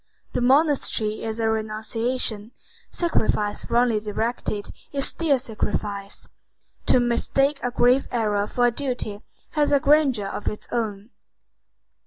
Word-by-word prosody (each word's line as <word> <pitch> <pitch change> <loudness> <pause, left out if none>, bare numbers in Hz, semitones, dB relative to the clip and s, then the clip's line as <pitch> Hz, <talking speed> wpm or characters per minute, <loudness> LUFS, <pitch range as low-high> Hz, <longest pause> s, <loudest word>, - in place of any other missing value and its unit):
The - - 0
monastery 260 -5 +2
is 220 0 -3
a 225 - +1
renunciation. 220 +1 -2 0.4
Sacrifice 215 - 0
wrongly 235 -2 +3
directed 215 0 -3 0.2
is 275 -1 0
still 310 -5 +2
sacrifice. 210 -4 -3 0.6
To - - +5
mistake 275 +4 +1
a 245 - 0
grave 245 +2 +3
error 210 -4 0
for 245 +2 +1
a 240 - +4
duty 240 -5 -3 0.3
has 295 -2 +1
a 285 - +5
grandeur 280 -7 +3
of 200 +1 -5
its 210 - -3
own. 220 -2 -3
235 Hz, 125 wpm, -24 LUFS, 215-260 Hz, 0.6 s, To